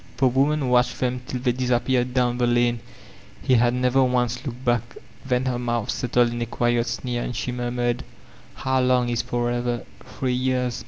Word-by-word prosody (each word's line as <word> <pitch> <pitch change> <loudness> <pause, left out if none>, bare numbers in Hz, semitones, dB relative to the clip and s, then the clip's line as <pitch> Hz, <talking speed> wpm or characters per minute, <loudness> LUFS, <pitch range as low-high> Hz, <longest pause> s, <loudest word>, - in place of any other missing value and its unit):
The 135 - +3
woman 135 +2 +1
watched 125 0 +2
them 125 0 -1
till 125 - -4
they 125 -1 +2
disappeared 125 0 0
down 125 -1 +1
the 120 - +2
lane; 120 0 +2 0.6
he 130 - +2
had 120 0 +4
never 125 +1 +3
once 125 -1 0
looked 125 0 -7
back. 120 -1 0 0.3
Then 125 -1 0
her 125 -2 -1
moadi 120 -1 -1
settled 120 -1 +1
in 120 0 -4
a 120 - -1
quiet 120 0 0
sneer 120 0 -3
and 125 - -4
she 125 - -2
murmured: 120 0 -1 0.5
^How 130 0 +1
Umg 125 -1 +2
is 120 - 0
'forever'? 120 0 -1 0.2
Three 130 -2 -3
years.' 125 -1 0
125 Hz, 180 wpm, -24 LUFS, 120-125 Hz, 0.6 s, had